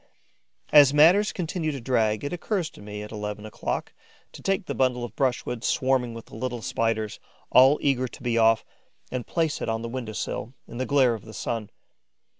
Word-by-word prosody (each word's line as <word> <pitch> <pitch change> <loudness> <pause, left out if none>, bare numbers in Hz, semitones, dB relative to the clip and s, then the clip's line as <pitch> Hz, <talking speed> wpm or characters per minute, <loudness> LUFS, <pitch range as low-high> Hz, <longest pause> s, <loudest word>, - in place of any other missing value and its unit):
As 145 -1 +7
matters 180 +8 +6
continue 165 -2 -2
to 140 - -5
drag, 110 -4 +1
it 145 - -3
occurs 175 -1 -2
to - - -15
me, 105 0 -7
at 105 - -9
eleven 105 -1 -5
o'clock, 110 - -4 0.4
to - - -12
take 195 -1 0
the - - -3
bundle 125 -2 +1
of 115 -2 -7
brushwood 125 -3 -1
swarming 130 -3 +1
with 115 - -9
the - - -13
little 120 0 -4
Spiders, 110 +2 -1 0.3
all 135 +3 +7
eager 130 -3 +2
to 120 - -13
be 120 -2 0
off, 115 -1 +4 0.5
and 125 -2 -4
place 165 -3 -1
it - - -2
on 115 0 -2
the - - -3
window 120 -3 -5
sill, 115 +4 -4
in 120 - -9
the 130 - -1
glare 135 -4 +4
of 110 -4 -7
the 110 - -10
sun. 115 -3 -3
125 Hz, 200 wpm, -26 LUFS, 110-140 Hz, 0.5 s, As